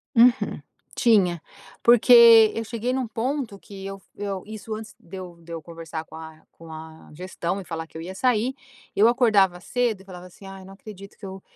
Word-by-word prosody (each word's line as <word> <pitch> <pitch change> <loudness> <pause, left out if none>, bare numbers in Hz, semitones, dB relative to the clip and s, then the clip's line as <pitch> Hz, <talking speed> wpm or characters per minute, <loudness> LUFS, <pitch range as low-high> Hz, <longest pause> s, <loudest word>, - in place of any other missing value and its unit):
Uhum, 240 +1 +3 0.3
tinha, 195 - +2 0.4
porque 235 -2 +7
eu 225 0 -4
cheguei 235 +2 -3
num 255 -2 -2
ponto 230 -1 -3
que 195 0 -11
eu 195 0 -7 0.2
eu 200 -2 -4
isso 215 0 -7
antes 220 0 -9
de 185 +3 -12
eu 180 -2 -9
de 170 0 -10
eu 165 - -6
conversar 165 -1 -8
com 160 - -15
a 160 -1 -11
com 165 0 -15
a 160 0 -11
gestão 180 +2 -4
e - - -10
falar 165 -1 -6
que - - -12
eu 160 - -7
ia 185 +3 -7
sair, 245 +3 0 0.4
eu 215 +3 +4
acordava 205 -7 +3
cedo 235 -2 -1
e - - -15
falava 180 -2 -11
assim 185 +2 -15
ai 195 -1 -10
não 195 - -12
acredito 200 -1 -12
que 205 - -11
eu, 190 0 -8
195 Hz, 200 wpm, -24 LUFS, 175-225 Hz, 0.4 s, porque